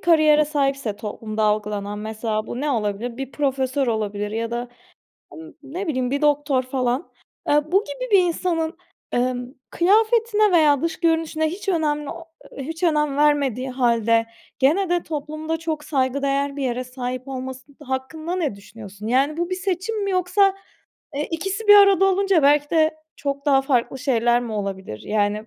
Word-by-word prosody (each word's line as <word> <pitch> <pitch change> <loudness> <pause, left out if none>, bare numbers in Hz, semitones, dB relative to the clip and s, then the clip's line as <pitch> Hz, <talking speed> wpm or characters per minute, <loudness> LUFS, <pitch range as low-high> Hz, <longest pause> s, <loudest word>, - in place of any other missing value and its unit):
kariyere 310 -3 +5
sahipse 275 -7 -1
toplumda 215 0 -4
algılanan 210 -1 -1
mesela 215 0 -3
bu 245 - -5
ne 295 0 0
olabilir: 225 0 -2
Bir 270 0 -6
profesör 270 -1 0
olabilir 210 -2 -2
ya 230 +1 -3
da, 240 +1 -3 0.7
ın 325 0 -11
ne 345 +8 -5
bileyim, 255 -4 -1
bir 280 +1 -1
doktor 290 -3 +2
falan. 255 +3 -2 0.4
Eee, 295 +2 +2
bu 395 +3 +4
gibi - - -6
bir 395 - +8
insanın, 335 -1 -1 0.4
emm, 245 0 0 0.2
kıyafetine 430 +2 +3
veya 300 -4 +4
dış 335 -1 -2
görünüşüne 325 -2 +1
hiç 395 +4 -8
önemli 300 -4 0
o 335 - -8 0.3
hiç 325 +6 -6
önem 300 -4 +2
vermediği 280 -4 +2
halde, 230 -3 +2 0.3
gene 330 +8 +3
de 350 -1 +1
toplumda 310 +1 -4
çok 315 -2 -4
saygıdeğer 275 +1 0
bir 280 - -3
yere 255 0 -1
sahip 255 +1 -5
olması 260 +1 -7
hakkında 295 +6 -4
ne 300 - -1
düşünüyorsun? 205 0 -11
Yani, 275 +6 +2
bu 345 +1 -2
bir 370 - 0
seçim 390 +3 -2
mi 395 - -1
yoksa, 375 +2 +3 0.6
eee, 295 +1 -2
ikisi 390 +6 -3
bir 415 - +10
arada 395 -2 +6
olunca 390 -4 +3
belki 290 +1 +4
de 315 -1 +2
çok 280 +1 -4
daha 270 -1 +4
farklı 265 -1 0
şeyler 240 -2 +2
mi 235 -2 -5
olabilir 195 - -4
yani? 210 +1 -1
280 Hz, 160 wpm, -22 LUFS, 245-330 Hz, 0.7 s, bir